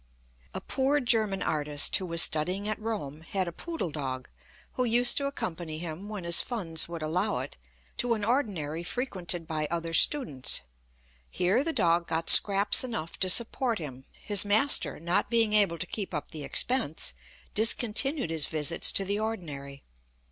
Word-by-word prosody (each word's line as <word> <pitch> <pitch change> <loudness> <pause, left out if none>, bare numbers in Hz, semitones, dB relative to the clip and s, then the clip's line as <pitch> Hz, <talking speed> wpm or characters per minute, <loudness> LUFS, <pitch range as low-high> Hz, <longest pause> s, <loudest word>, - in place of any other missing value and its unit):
A - - -4
poor 275 +2 +1
German 220 -6 0
artist, 150 -1 +1
who 185 - -6
was 170 -1 +5
studying 180 +7 0
at 215 0 -4
Rome, 180 -10 -5
had 185 +3 -3
a - - -4
poodle 325 - -5
dog, 130 -3 -5 0.4
who 255 - -1
used 240 +1 +5
to 280 - 0
accompany 170 - -5
him, 170 +4 -7
when 210 -4 -6
his 170 0 +6
funds 170 -10 0
would 170 -2 -6
allow 180 +7 -1
it, - - -6 0.4
to 245 -2 0
an 210 -2 -4
ordinary 190 - -2
frequented 180 -5 -4
by 155 -2 -3
other 165 -1 -4
students. 165 - +1 0.7
Here 185 - +1
the 325 - -1
dog 170 - +1
got 165 0 +2
scraps 200 +2 +5
enough 230 -10 -6
to 185 - +1
support 235 +3 +2
him. 135 -5 -9
His 205 -2 +2
master, 215 +8 +2
not 170 +5 -1
being 225 -2 +2
able 200 -5 +4
to 180 - -4
keep 195 -2 -4
up 150 - -5
the 155 -2 -8
expense, 160 - +1 0.4
discontinued 230 - +2
his 160 -2 -1
visits 155 +1 +1
to 195 - 0
the 200 +2 -2
ordinary. 150 -11 -6
185 Hz, 165 wpm, -28 LUFS, 160-225 Hz, 0.7 s, his